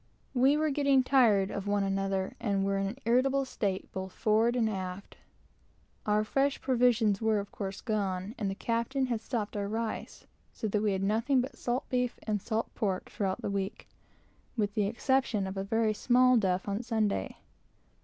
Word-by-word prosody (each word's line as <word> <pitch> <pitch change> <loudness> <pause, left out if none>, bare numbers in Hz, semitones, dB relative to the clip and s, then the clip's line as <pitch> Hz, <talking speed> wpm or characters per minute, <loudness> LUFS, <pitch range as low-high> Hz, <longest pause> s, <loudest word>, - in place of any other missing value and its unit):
We 270 +3 +4
were 310 0 +1
getting 275 -2 +3
tired 225 -8 +4
of 200 0 -4
one 205 0 +1
another, 195 -1 -1
and 200 -4 0
were 195 0 0
in 195 - 0
an 215 +6 -5
irritable 265 +3 +3
state, 200 -7 -3
both 190 -1 -5
forward 225 +2 +2
and 235 -3 +2
aft. 190 -2 -5 0.9
Our 210 0 +3
fresh 275 +5 +1
provisions 240 -5 +2
were, 220 -1 +2
of 200 0 -4
course, 195 -1 -5
gone, 200 -3 -2
and 205 -3 -1
the 195 - -3
captain 235 +5 -1
had 235 -3 -2
stopped 225 -4 -3
our 200 -1 -1
rice, 225 +1 -4 0.3
so 220 - -3
that 205 +1 0
we 210 -2 +1
had 190 0 -1
nothing 230 +7 +2
but 260 +3 -3
salt 245 +3 -2
beef 250 -1 0
and 210 -2 -1
salt 225 +2 -2
pork 195 -5 -2
throughout 190 -2 -2
the - - -1
week, 195 0 -3 0.7
with 205 -2 0
the 205 -1 +1
exception 235 -2 +1
of 190 0 -5
a 195 - -2
very 220 +2 +1
small 255 +3 +4
duff 190 -4 +1
on 200 +2 -1
Sunday. 220 - -1
215 Hz, 185 wpm, -30 LUFS, 195-245 Hz, 0.9 s, We